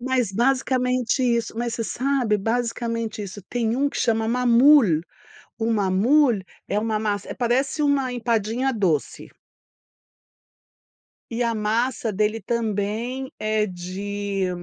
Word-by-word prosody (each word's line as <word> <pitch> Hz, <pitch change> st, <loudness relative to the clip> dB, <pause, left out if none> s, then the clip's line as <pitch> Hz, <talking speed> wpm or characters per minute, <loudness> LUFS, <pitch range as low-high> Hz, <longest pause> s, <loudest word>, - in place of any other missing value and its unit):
Mas, 250 Hz, -4 st, 0 dB
basicamente 250 Hz, +2 st, +1 dB
isso. 235 Hz, -2 st, 0 dB
Mas 235 Hz, -1 st, -2 dB
você 230 Hz, -, -2 dB
sabe 250 Hz, -5 st, 0 dB
basicamente 230 Hz, 0 st, -2 dB
isso. 200 Hz, 0 st, -8 dB
Tem 230 Hz, +2 st, -1 dB
um 285 Hz, +1 st, +2 dB
que -, -, -8 dB
chama 225 Hz, -1 st, +1 dB
maamoul 245 Hz, -, +5 dB, 0.6 s
o 230 Hz, 0 st, 0 dB
maamoul 220 Hz, +5 st, +3 dB, 0.3 s
é 205 Hz, -, 0 dB
uma 215 Hz, 0 st, -1 dB
massa, 205 Hz, -2 st, -2 dB
eh -, -, -5 dB
parece 260 Hz, +5 st, 0 dB
uma 275 Hz, -3 st, +1 dB
empadinha 235 Hz, +2 st, 0 dB
doce. 185 Hz, -, -1 dB, 2.1 s
E 235 Hz, -, -2 dB
a 230 Hz, -1 st, 0 dB
massa 225 Hz, +2 st, 0 dB
dele 210 Hz, +2 st, 0 dB
também 230 Hz, +4 st, -2 dB
é 215 Hz, 0 st, +1 dB
de 195 Hz, +2 st, -4 dB
230 Hz, 125 wpm, -23 LUFS, 210-250 Hz, 2.1 s, maamoul